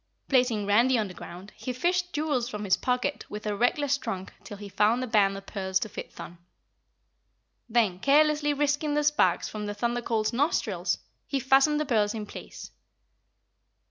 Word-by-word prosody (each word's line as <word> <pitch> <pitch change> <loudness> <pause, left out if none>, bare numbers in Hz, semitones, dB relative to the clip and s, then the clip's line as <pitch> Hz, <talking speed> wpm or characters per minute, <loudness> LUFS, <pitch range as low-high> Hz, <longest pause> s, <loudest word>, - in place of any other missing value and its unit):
Placing 245 -6 +2
Randy 235 +5 +4
on 215 -2 0
the - - -9
ground, 180 +4 -10
he 255 - -5
fished 355 +7 0
jewels 290 -5 -1
from 210 -3 -5
his 195 -2 +3
pocket 250 +3 -1
with 210 +1 -7
a 210 -1 -1
reckless 285 +5 +1
trunk 190 -7 -5
till 200 +1 -9
he 205 0 -8
found 215 +5 +2
a - - -1
band 205 -4 +2
of 195 - -10
pearls 190 -2 -2
to 215 - -3
fit - - -8
Thun. 175 0 -10 1.3
Then 220 -6 +2
carelessly 295 +3 +3
risking 290 +1 0
the 295 - +2
sparks 290 -12 +2
from 210 -1 -5
the 205 - -4
Thunder 240 +3 -1
Colt's 225 -1 -1
nostrils, 200 - 0 0.3
he 275 - -1
fastened 270 +3 +4
the 305 - -1
pearls 215 -5 +1
in 215 -1 -4
place. - - -10
235 Hz, 175 wpm, -27 LUFS, 205-280 Hz, 1.3 s, Randy